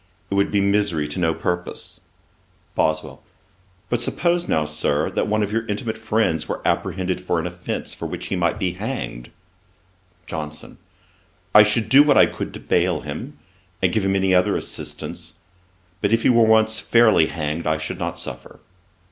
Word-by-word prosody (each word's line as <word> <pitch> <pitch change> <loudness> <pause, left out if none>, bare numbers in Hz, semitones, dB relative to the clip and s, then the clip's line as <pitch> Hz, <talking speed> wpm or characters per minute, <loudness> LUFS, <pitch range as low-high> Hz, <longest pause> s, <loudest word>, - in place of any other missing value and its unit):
It - - 0
would 100 0 +2
be 100 - +2
misery 100 -6 +1
to 75 - -4
no 80 -2 +1
purpose.' 90 0 -4 0.7
BOSWELL. 80 0 -1 0.7
'But 120 -1 -1
suppose 175 +7 0
now, 80 -1 +1
Sir, 75 0 -1
that - - -1
one 110 0 +1
of 105 - -3
your 115 +1 0
intimate 110 +2 -3
friends 110 -7 0
were - - -2
apprehended 90 0 -1
for 90 -2 0
an 80 - -3
offence 90 0 -4
for - - -5
which - - -6
he - - -1
might 85 -2 0
be 90 - -1
hanged.' 95 - -5 1.0
JOHNSON. 75 -2 -7 0.7
'I 105 - +10
should 105 +1 +2
do 135 +5 +7
what 145 -1 +4
I - - +8
could - - -5
to - - -7
bail 90 -2 +1
him, 80 - -7 0.4
and 95 -2 +1
give 110 - +1
him 95 0 +1
any 95 -1 +2
other 90 0 +3
assistance; - - -7 0.7
but 100 - +1
if 115 0 +2
he - - +4
were 115 -2 +5
once 110 0 +4
fairly 110 -9 +4
hanged, 80 +1 -3
I 80 0 +2
should 80 0 -5
not - - -3
suffer.' - - -8
95 Hz, 175 wpm, -22 LUFS, 80-110 Hz, 1.0 s, I